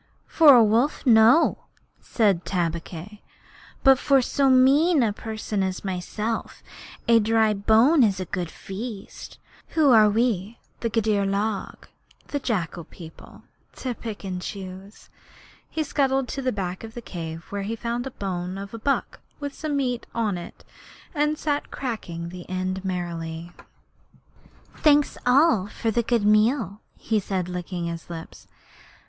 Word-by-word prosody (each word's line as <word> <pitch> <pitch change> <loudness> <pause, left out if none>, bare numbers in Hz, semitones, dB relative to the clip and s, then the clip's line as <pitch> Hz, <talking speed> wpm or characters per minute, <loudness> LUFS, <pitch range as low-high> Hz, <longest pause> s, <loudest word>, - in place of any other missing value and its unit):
'For 300 -5 +7
a 235 - +7
wolf, 230 +9 +1
no,' 230 +5 +5 0.3
said 200 -7 +1
Tabaqui; 175 +3 -4 0.6
'but 270 -2 +6
for 275 -1 +4
so 270 +2 +1
mean 275 +4 +5
a 215 -3 +1
person 215 -1 -4
as 190 0 -3
myself 210 +4 -4 0.4
a 230 -1 +6
dry 220 0 +3
bone 225 +9 +4
is 200 -4 +2
a 185 - -3
good 180 -2 -4
feast. 200 +3 -8 0.4
Who 305 -4 +5
are 215 -3 +7
we, 220 -1 0 0.2
the 230 - -1
Gidur 215 -2 +1
log 200 0 -3 0.4
[the 285 - -2
jackal 175 - -3
people], 160 -1 -13 0.3
to 255 -2 -4
pick 225 -3 -7
and 185 -2 -4
choose?' 190 +1 -9 0.6
He 315 - -2
scuttled 270 -3 0
to 275 - -4
the 255 -1 0
back 185 -2 -4
of 225 0 -9
the 240 - -6
cave, 165 -3 -7
where 200 0 -3
he 210 +3 -3
found 235 +1 -3
the 270 - -5
bone 185 -5 -4
of 200 +1 -8
a 230 - -6
buck 275 +5 -1 0.2
with 285 -1 -5
some 300 -1 -3
meat 250 -3 -2
on 220 -4 0
it, 175 - -9 0.5
and 300 0 +1
sat 290 -1 -2
cracking 175 -10 -5
the 180 0 -10
end 185 +1 -3
merrily. 170 -2 -4 1.2
'All - - -20
thanks 295 -1 +4 0.6
for 225 - -1
this 235 +1 0
good 230 -4 +2
meal,' 215 -1 +2 0.2
he 220 -1 0
said, 190 -2 -3
licking 180 -1 -4
his 170 0 -6
lips. 165 -1 -9
215 Hz, 150 wpm, -24 LUFS, 185-245 Hz, 1.2 s, For